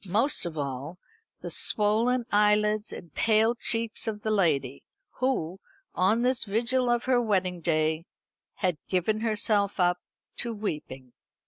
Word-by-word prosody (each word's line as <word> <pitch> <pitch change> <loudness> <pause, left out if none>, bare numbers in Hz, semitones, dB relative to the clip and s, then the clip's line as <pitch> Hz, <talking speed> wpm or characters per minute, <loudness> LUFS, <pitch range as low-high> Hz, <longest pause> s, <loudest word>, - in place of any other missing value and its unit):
Most 220 +2 +2
of 160 -2 -7
all, 140 +4 -4 0.4
the - - -6
swollen 230 +4 +2
eyelids 210 +1 +2
and 170 -4 -10
pale 220 +1 +3
cheeks 230 -1 0
of 210 -1 -4
the 215 - -1
lady, 145 -10 +1 0.4
who, 195 -9 -1 0.3
on 215 +6 +2
this 255 0 +2
vigil 240 +4 0
of 240 0 +1
her 250 -1 +2
wedding 190 -5 0
day, 160 0 0 0.5
had 180 -6 -1
given 195 +4 0
herself 210 -2 0
up 180 0 +2 0.4
to 235 -1 0
weeping. 140 - -6
210 Hz, 135 wpm, -27 LUFS, 175-230 Hz, 0.5 s, pale